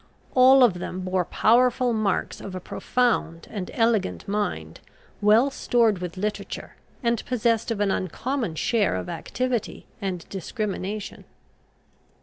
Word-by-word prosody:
All 260 +1 +7
of 195 -8 +3
them 185 +1 -5
bore 185 -1 0
powerful 245 +4 +3
marks 215 -3 -1
of 190 - -7
a - - -3
profound 180 -6 -1
and 195 -4 -5
elegant 220 - 0
mind, 205 +1 -2 0.4
well 220 +7 +5
stored 230 -7 +2
with 180 0 -6
literature, 210 +2 -4 0.3
and 235 -1 +1
possessed 230 -2 +1
of 225 -3 -2
an 205 -1 +2
uncommon 220 - -2
share 205 - +1
of 90 -1 -4
activity 255 -3 -3 0.2
and 185 -4 -4
discrimination. 200 +1 -4
210 Hz, 130 wpm, -25 LUFS, 185-235 Hz, 0.4 s, All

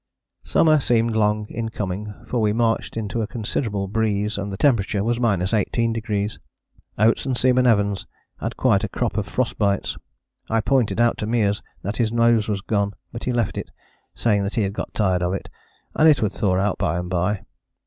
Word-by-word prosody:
Summer 155 -2 +3
seemed 115 -3 +1
long 105 -1 +2
in 115 0 -3
coming 105 -1 -4
for 120 - -1
we 105 -1 +2
marched 115 0 0
into 110 +1 -2
a 110 - -2
considerable 105 -3 -2
breeze 105 0 0
and 100 0 -4
the 95 - -5
temperature 105 -7 +2
was 120 +2 0
18°. 110 0 0 0.6
Oates 110 +4 +3
and 130 -2 0
Seaman 125 0 +3
Evans 100 -4 +2 0.3
had - - -4
quite 110 -6 +3
a 105 - -2
crop 120 +3 -2
of 105 -2 -1
frost 120 +3 -2
bites. 100 -2 0 0.5
I 115 - +2
pointed 120 0 +1
out 120 0 +3
to 105 - -2
Meares 105 -3 +1 0.2
that 100 +3 -3
his 115 -3 +1
nose 115 -2 +3
was 100 -2 -1
gone; 100 -1 -1 0.2
but 115 - -6
he 125 - 0
left 115 -5 0
it, - - -7 0.5
saying 105 -3 +2
that 100 +1 -3
he 110 - +2
had 100 0 -2
got - - -5
tired 95 -4 +2
of 90 +2 0
it, - - -6 0.4
and 160 - +5
it 150 - +5
would 105 - 0
thaw 95 -3 +1
out 100 +1 0
by 80 +2 0
and 90 0 -3
by. 90 +3 -1
105 Hz, 195 wpm, -22 LUFS, 100-115 Hz, 0.6 s, and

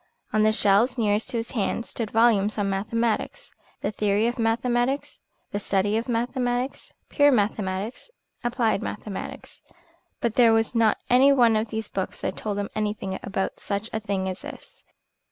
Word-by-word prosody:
On 215 - +3
the 215 0 +5
shelves 215 +4 +3
nearest 210 -1 +1
to 240 - -2
his 230 0 -3
hand 230 0 -1
stood 225 -3 -3
volumes 220 -2 +3
on 205 -1 0
mathematics, 230 - -2 0.3
the - - -1
theory 210 +1 +1
of 240 +1 -1
mathematics, 240 +4 0 0.3
the 205 - -2
study 200 +1 +1
of 230 +3 -2
mathematics, 245 +2 -1 0.2
pure 290 -1 +4
mathematics, 205 - -1 0.3
applied 240 -3 +1
mathematics. 210 -2 -7 0.6
But 235 -2 0
there 230 -2 +5
was 225 +1 +2
not 225 -2 +3
any 260 +3 +6
one 240 -5 +5
of 215 +1 0
these 220 -1 -4
books 190 -1 -4
that - - -2
told 210 -2 -3
him 200 0 -2
anything 210 -3 -3
about 195 -1 -3
such 200 +2 -3
a 220 - 0
thing 195 -3 -2
as 185 0 -5
this. - - -11
220 Hz, 165 wpm, -25 LUFS, 205-240 Hz, 0.6 s, any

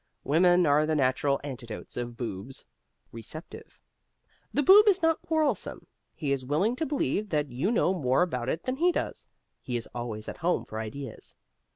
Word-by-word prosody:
Women 175 +5 +4
are 150 +1 +3
the 155 - +1
natural 140 0 +2
antidotes 125 -6 -7
of 120 -1 -4
Boobs. 120 +1 -5 0.5
RECEPTIVE 155 - -10 0.7
The 290 - +1
Boob 415 +7 +8
is 390 -3 +4
not 325 0 +3
quarrelsome. 315 -2 -1 0.3
He 145 -4 -2
is 135 -2 0
willing 160 - +1
to 320 - -1
believe 215 - -1
that 150 -5 -1
you 130 +11 0
know 220 -5 +2
more 135 -3 +2
about 125 -8 -2
it 160 - -2
than 255 +1 -2
he 350 +4 +4
does. - - -3 0.3
He 125 -2 -3
is 115 - -6
always 115 -3 -5
at - - -6
home 175 0 0
for 110 - -6
ideas. 110 +2 -7
145 Hz, 175 wpm, -28 LUFS, 125-210 Hz, 0.7 s, Boob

